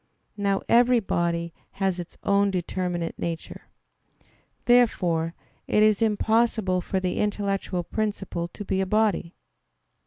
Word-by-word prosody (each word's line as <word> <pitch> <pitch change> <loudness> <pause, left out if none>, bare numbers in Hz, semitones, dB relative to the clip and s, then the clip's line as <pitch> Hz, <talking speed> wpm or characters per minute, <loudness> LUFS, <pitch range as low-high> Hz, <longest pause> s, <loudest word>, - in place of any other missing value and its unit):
Now 200 -1 0
every 245 +1 +5
body 170 -4 -1 0.2
has 190 -2 -1
its 175 - -8
own 200 0 +3
determinate 180 -2 -3
nature. 165 -1 -5 1.0
Therefore 175 -9 +3 0.3
it 210 - +3
is 215 -1 +3
impossible 220 -3 +2
for 190 - -2
the 185 -1 -2
intellectual 200 -3 -1
principle 195 -4 -3
to 205 +4 -9
be 190 0 0
a 190 - -1
body. 210 -5 +1
195 Hz, 120 wpm, -25 LUFS, 175-215 Hz, 1.0 s, every